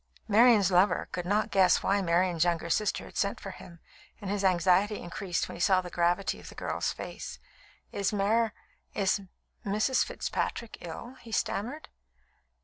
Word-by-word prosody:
Marian's 215 -2 +5
lover 185 +3 +3
could 180 -1 -4
not 210 +2 +1
guess 190 -2 +4
why 200 +1 +2
Marian's 175 -1 +2
younger 170 -1 0
sister 210 +2 0
had - - -14
sent 200 0 0
for 195 - -7
him, 170 -2 -13 0.4
and 200 -3 -4
his 205 -1 -1
anxiety 190 +3 +3
increased 175 +1 -3
when - - -8
he - - -9
saw 185 +1 +4
the 180 -1 -6
gravity 175 +3 0
of - - -11
the - - -13
girl's - - -2
face. - - -7 0.5
"Is 200 -1 -1
Mar 215 +2 +2 0.4
is 200 0 +1 0.4
Mrs. 215 +6 +2
Fitzpatrick 230 -1 -4
ill?" 235 +10 -8
he 230 - -12
stammered. 245 +8 -2
195 Hz, 160 wpm, -29 LUFS, 180-210 Hz, 0.5 s, Marian's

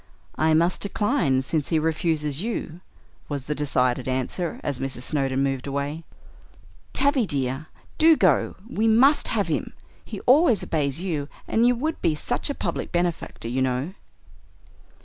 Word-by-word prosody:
"I 155 0 +4
must 170 +3 +2
decline, 200 - +1
since 150 +1 -2
he 160 - +2
refuses 155 -2 0
you" 185 -6 -4 0.5
was 140 -3 -3
the 150 - -2
decided 130 -3 0
answer, 130 +7 -2
as 140 -3 -2
Mrs. 130 -2 -3
Snowdon 135 -2 0
moved 135 -1 -2
away. 140 +3 -3 0.9
"Tavie, 275 -6 +3
dear, 135 +1 -1 0.3
do 320 0 +6
go; 180 -8 +2
we 225 -2 0
must 260 +7 +5
have - - 0
him; - - -2 0.3
he - - -7
always 255 - +4
obeys 145 -1 -1
you, 155 -6 -3 0.2
and 230 +2 +3
you 245 - +4
would 310 +7 -3
be 155 - +2
such 245 - -2
a 285 - -2
public - - -3
benefactor, 175 -8 -2
you 125 +3 -1
know." 130 +6 -1
155 Hz, 150 wpm, -24 LUFS, 135-210 Hz, 0.9 s, do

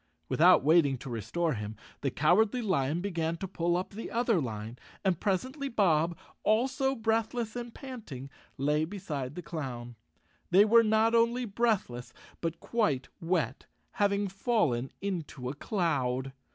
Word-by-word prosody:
Without - - +5
waiting 150 -3 +4
to 130 +1 -8
restore 155 - -1
him, 105 -1 -5 0.3
the 140 - +1
Cowardly 205 - +3
Lion 165 -5 +1
began 170 -4 -1
to 190 - -4
pull 175 -1 0
up 185 - -4
the 220 +3 -6
other 230 -6 +2
line, 110 -1 -5 0.3
and 185 -4 +2
pres¬ 195 +4 0
ently 280 +1 -5
Bob, 170 -7 +2 0.2
also 265 +5 +2
breathless 225 0 -1
and 240 -1 -5
panting, 210 - -8 0.3
lay 150 +3 +1
beside 155 -7 -4
the 180 - -6
clown. 120 -7 -5 0.5
They 195 +4 +7
were 230 +2 +7
not 220 +1 +3
only 235 +2 +3
breathless, 200 - -1 0.3
but 165 0 -2
quite 150 - 0
wet— 165 -7 -1 0.2
having 200 0 +1
fallen 190 - 0
into 160 -9 -3
a - - -3
cloud. 135 - -1
175 Hz, 145 wpm, -30 LUFS, 140-220 Hz, 0.5 s, They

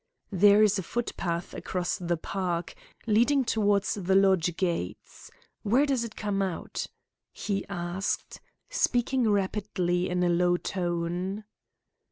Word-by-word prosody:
"There 205 +2 +6
is 210 -1 +3
a - - -1
footpath 175 -5 -3
across 180 -1 -3
the 175 -1 -1
park, 175 0 -3 0.3
leading 240 +5 +3
towards 205 -3 +2
the 190 -1 0
lodge 190 -3 +3
gates. 170 - -3 0.3
Where 245 +8 +3
does 270 -4 0
it 230 -2 -7
come 205 -2 -1
out?" 190 -3 -3 0.4
he 200 -2 -3
asked, 175 +1 -3 0.3
speaking 255 - +1
rapidly 190 -3 0
in 180 0 0
a - - +3
low 175 +1 +3
tone. 175 +3 -2
195 Hz, 125 wpm, -28 LUFS, 175-210 Hz, 0.4 s, There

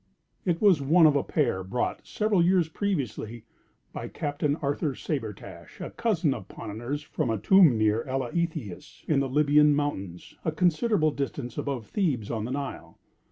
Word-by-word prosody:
It 170 -3 +1
was 190 -8 +4
one 160 +5 +5
of 150 -2 +5
a 140 - +3
pair 120 - 0
brought, 100 +7 -3
several 210 -4 +1
years 180 -2 +3
previously, 135 - -3 0.5
by - - -5
Captain 145 0 -2
Arthur 145 -1 -2
Sabretash, 115 -10 -6
a - - -6
cousin 180 -11 +1
of 110 -7 -8
Ponnonner's 120 +8 -5
from 150 - -2
a 110 - 0
tomb 170 - +5
near 110 +1 +2
Eleithias, 135 - -4
in 150 -3 +3
the 135 -1 -1
Lybian 150 +1 +4
mountains, 100 -12 -4
a 160 - 0
considerable 170 +1 +2
distance 140 -4 -4
above 135 -6 -3
Thebes 135 - -1
on 110 -2 -2
the 120 - -5
Nile. 140 0 -5
145 Hz, 160 wpm, -27 LUFS, 120-165 Hz, 0.5 s, one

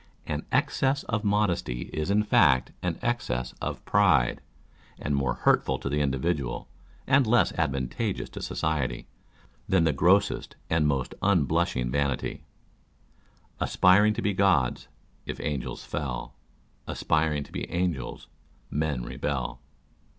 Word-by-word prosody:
An - - -4
excess 135 +1 +1
of 115 -2 -2
modesty 100 - 0
is 75 +2 -2
in 105 +1 +3
fact 65 -10 +4
an 90 -2 -2
excess 65 - -1
of - - -4
pride, 90 -12 +3 0.6
and 75 - -3
more 70 -3 0
hurtful - - +2
to - - -4
the 75 +1 0
individual, 70 -1 -1 0.4
and 130 -2 +4
less 120 +1 +4
advan 65 -1 -1
tageous 65 - -2
to - - -7
society, 75 -5 -2 0.6
than 95 -3 +4
the 80 -2 +2
grossest 95 +8 +2 0.2
and 80 -2 +3
most 70 -3 -1
unblushing 80 -9 +1
vanity 70 -2 -1 1.2
Aspiring 105 +4 +4
to - - -3
be 105 - +1
gods, 95 -10 +2 0.4
if - - -5
angels 75 -3 -3
fell, - - -4 0.5
Aspiring 75 -2 0
to 70 - -16
be - - -5
angels, 85 -8 -2 0.4
men 75 -4 -1
rebel. 60 -3 -3
75 Hz, 130 wpm, -27 LUFS, 65-100 Hz, 1.2 s, fact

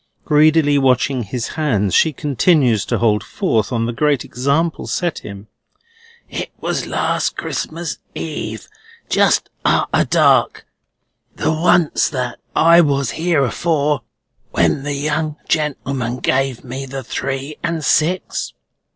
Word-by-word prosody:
Greedily 150 -1 +4
watching 130 0 +2
his 115 +2 -4
hands, 110 - 0
she 160 - +4
continues 140 - +2
to - - -1
hold 105 -3 +2
forth 115 - -1
on 115 -2 0
the 120 - -2
great 145 0 +1
example 140 +6 -1
set 175 -3 -1
him. 100 0 -10 0.8
"It - - -5
was - - -2
last - - -1
Christmas 165 -1 -4 0.2
Eve, 155 -2 -5 0.4
just - - +2
arter - - +2
dark, - - +3 0.7
the - - 0
once 165 0 +2
that 125 -4 -4 0.2
I 170 +1 +6
was 140 -5 +1
here 160 -3 +1
afore, 150 0 0 0.5
when - - +1
the 145 +1 -3
young 150 +1 -1
gentleman 135 -5 -1
gave 130 0 0
me 135 +1 -6
the 135 0 -6
three 135 +4 -4
and 170 -2 -2
six." 175 +4 0
140 Hz, 125 wpm, -18 LUFS, 125-155 Hz, 0.8 s, I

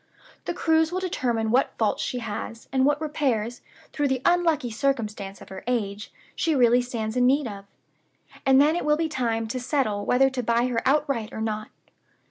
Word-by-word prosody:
The - - -3
cruise 320 0 +2
will 365 - -1
determine 240 -11 -1
what 255 +3 +1
faults 220 -2 +1
she 250 - -2
has, 230 0 -6
and 265 0 +2
what 290 0 +2
repairs, 260 -7 -1 0.3
through 290 -1 +1
the 265 -1 -1
unlucky 330 -8 +2
circumstance 215 -6 -2
of - - -12
her 190 -1 -8
age, 210 -4 -2 0.2
she 325 -2 +1
really 245 -1 +5
stands 230 -3 -4
in 250 0 +4
need 280 +2 +3
of. 200 -2 -8 0.8
And 265 -1 +5
then 300 +3 +4
it 350 - -1
will 300 0 +2
be 325 0 0
time 230 -6 -1
to 255 - -3
settle 245 -6 -1
whether 270 +2 +3
to 260 -1 -2
buy 235 +1 +1
her 230 -2 0
outright 275 -6 +1
or - - -6
not. 215 -1 -3
250 Hz, 190 wpm, -25 LUFS, 225-290 Hz, 0.8 s, really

